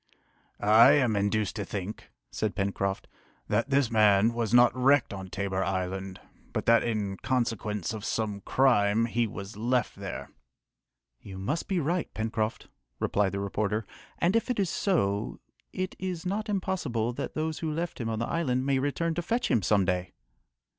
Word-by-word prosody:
"I 110 Hz, +6 st, +7 dB
am 125 Hz, -7 st, +3 dB
induced 100 Hz, -1 st, 0 dB
to 105 Hz, -, -2 dB
think," 100 Hz, +1 st, -6 dB, 0.2 s
said 110 Hz, -2 st, -2 dB
Pencroft, 100 Hz, -1 st, -2 dB, 0.4 s
"that -, -, +1 dB
this 135 Hz, -3 st, +2 dB
man 105 Hz, 0 st, +4 dB
was 115 Hz, -3 st, -1 dB
not 120 Hz, +1 st, +6 dB
wrecked 130 Hz, -2 st, +3 dB
on 95 Hz, -1 st, -7 dB
Tabor 95 Hz, 0 st, -2 dB
Island, 95 Hz, 0 st, -3 dB, 0.3 s
but -, -, -2 dB
that 115 Hz, 0 st, +5 dB
in 105 Hz, -4 st, -2 dB
consequence 110 Hz, -6 st, -1 dB
of 110 Hz, -2 st, -6 dB
some 105 Hz, -3 st, -2 dB
crime 115 Hz, -3 st, +3 dB
he 120 Hz, 0 st, 0 dB
was 100 Hz, 0 st, -8 dB
left 120 Hz, +1 st, 0 dB
there." -, -, -6 dB, 0.9 s
"You 95 Hz, -1 st, -10 dB
must 140 Hz, -, -2 dB
be 190 Hz, -2 st, 0 dB
right, 170 Hz, +3 st, -1 dB
Pencroft," 110 Hz, 0 st, -2 dB, 0.3 s
replied 100 Hz, -1 st, +1 dB
the 100 Hz, -, -2 dB
reporter, 105 Hz, +2 st, -1 dB, 0.3 s
"and 180 Hz, +5 st, +2 dB
if 230 Hz, -, +1 dB
it 250 Hz, -, 0 dB
is 195 Hz, -3 st, +1 dB
so 105 Hz, -, 0 dB, 0.3 s
it 185 Hz, 0 st, -3 dB
is 185 Hz, -2 st, -4 dB
not 205 Hz, +4 st, -2 dB
impossible 180 Hz, -, -1 dB
that -, -, -5 dB
those 155 Hz, 0 st, -2 dB
who 160 Hz, -2 st, -2 dB
left 165 Hz, -2 st, -3 dB
him 115 Hz, -, -2 dB
on 110 Hz, -, -2 dB
the 115 Hz, -, -1 dB
island 130 Hz, -6 st, 0 dB
may 135 Hz, -1 st, +2 dB
return 155 Hz, +5 st, -1 dB
to 175 Hz, -, -2 dB
fetch 235 Hz, +8 st, -1 dB
him 115 Hz, -, +3 dB
some 100 Hz, +1 st, +3 dB
day!" 90 Hz, 0 st, -1 dB
115 Hz, 170 wpm, -28 LUFS, 100-145 Hz, 0.9 s, I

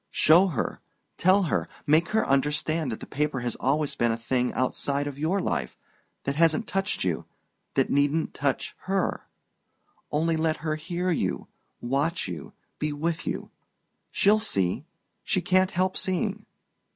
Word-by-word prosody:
"Show 170 Hz, +5 st, +5 dB
her 155 Hz, -10 st, -2 dB, 0.4 s
tell 190 Hz, +2 st, +4 dB
her 170 Hz, -, 0 dB, 0.2 s
make 155 Hz, +3 st, +4 dB
her 220 Hz, 0 st, +1 dB
understand 150 Hz, +1 st, +1 dB
that 110 Hz, -, -5 dB
the -, -, -6 dB
paper 145 Hz, -3 st, -1 dB
has 120 Hz, -2 st, -2 dB
always 145 Hz, +2 st, +1 dB
been 120 Hz, -1 st, +1 dB
a 115 Hz, -, -1 dB
thing 125 Hz, +2 st, 0 dB
outside 140 Hz, +2 st, 0 dB
your 160 Hz, +7 st, 0 dB
life 70 Hz, -, -2 dB, 0.5 s
that 140 Hz, -, -1 dB
hasn't 165 Hz, +6 st, +3 dB
touched 195 Hz, +1 st, -1 dB
you 90 Hz, -4 st, -1 dB, 0.5 s
that -, -, +2 dB
needn't 145 Hz, +3 st, +2 dB
touch 140 Hz, -2 st, -1 dB
her. 195 Hz, 0 st, 0 dB, 0.8 s
Only, 160 Hz, +2 st, +1 dB
let 160 Hz, 0 st, +1 dB
her 155 Hz, -1 st, +1 dB
hear 175 Hz, +3 st, -2 dB
you 165 Hz, -, -1 dB, 0.3 s
watch 140 Hz, -, 0 dB
you 85 Hz, -6 st, -7 dB, 0.3 s
be 150 Hz, 0 st, 0 dB
with 160 Hz, +3 st, -2 dB
you -, -, -3 dB, 0.6 s
she'll 210 Hz, +2 st, +4 dB
see...she 95 Hz, -, -2 dB
can't 185 Hz, 0 st, +3 dB
help 185 Hz, +1 st, 0 dB
seeing..." 200 Hz, +3 st, -1 dB
155 Hz, 145 wpm, -27 LUFS, 140-180 Hz, 0.8 s, Show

